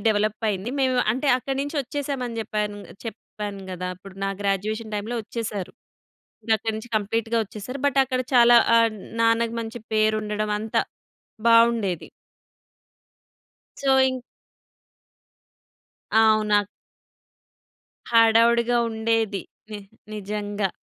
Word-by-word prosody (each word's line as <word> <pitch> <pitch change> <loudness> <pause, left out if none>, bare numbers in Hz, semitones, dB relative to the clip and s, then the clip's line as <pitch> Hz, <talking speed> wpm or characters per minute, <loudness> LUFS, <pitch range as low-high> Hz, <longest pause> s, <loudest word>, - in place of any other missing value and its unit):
డెవలపయింది. 215 0 0
మేం 260 -1 +2 0.2
అంటే 265 +5 -1
అక్కడినించి 275 +4 -3
ఒచ్చేసాం 280 0 -4
అని 230 -1 -6
జెప్పాను 210 -1 -3 0.3
చెప్పాను 210 -3 -7
గదా! 180 0 -4
ఇప్పుడు 190 +1 -13
నా - - 0
గ్రాడ్యుయేషన్ 215 +3 -2
టైమ్‌లో 215 +4 -3
ఒచ్చేసారు. 210 -4 -5 0.7
ఇంక 230 - -8
అక్కడి 220 +1 -3
నుంచి 235 +2 -9
కంప్లీట్‌గా 225 +2 -1
ఒచ్చేసారు. 220 +7 -7
బట్ 275 -1 +1
అక్కడ 255 -1 -2
చాలా 240 -1 +7 0.2
ఆహ్, 230 -1 +4 0.3
నాన్నకి 230 0 +2
మంచి 230 +1 -6
పేరు 215 0 +3
ఉండడం 210 0 -2
అంతా 220 +1 0 0.7
బావుండేది. 230 -6 +3 1.7
సో, 275 - -1 0.2
ఇం 260 - -2 2.0
అవును. 215 -1 +4
అక్ 205 - -7 1.4
హడావిడిగా 230 +1 +4
ఉండేది. 220 -2 0 0.3
ని 210 - -5 0.4
నిజంగా. 205 -1 -3
220 Hz, 105 wpm, -24 LUFS, 210-235 Hz, 2.0 s, చాలా